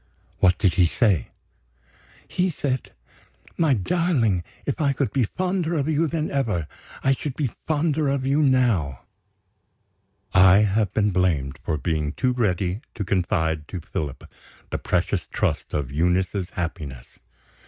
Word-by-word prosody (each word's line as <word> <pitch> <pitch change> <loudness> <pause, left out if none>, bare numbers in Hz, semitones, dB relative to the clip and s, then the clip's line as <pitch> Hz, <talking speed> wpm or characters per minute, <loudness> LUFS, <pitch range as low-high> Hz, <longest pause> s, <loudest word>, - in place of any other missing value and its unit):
"What 90 -1 +4
did 95 -4 +2
he 90 -2 +4
say?" 95 - +2 1.0
"He 185 +1 0
said: 135 -5 -3 0.6
'My 155 -5 +3
darling, 115 - +1 0.2
if 140 - -2
I 140 -2 +3
could 135 0 -1
be 130 -4 +2
fonder 180 - -1
of 145 -2 0
you 160 +1 +2
than 155 0 -2
ever, 115 - 0 0.4
I 135 - +4
should 135 0 -4
be 140 -7 -1 0.2
fonder 155 -1 +1
of 135 -1 0
you 140 +3 +2
now.'" 120 - +2 1.3
I 95 +2 +7
have 105 -1 +1
been 105 -1 +1
blamed 85 -8 0
for 80 - -1
being 75 -2 -1
too 125 +6 +1
ready 100 -4 0
to 105 - -2
confide 80 -5 0
to 90 - -5
Philip 75 -3 -5 0.5
the - - -2
precious - - -1
trust - - -1
of 70 -4 -2
Eunice's 90 +4 0
happiness. 75 -8 -5
105 Hz, 145 wpm, -24 LUFS, 85-140 Hz, 1.3 s, I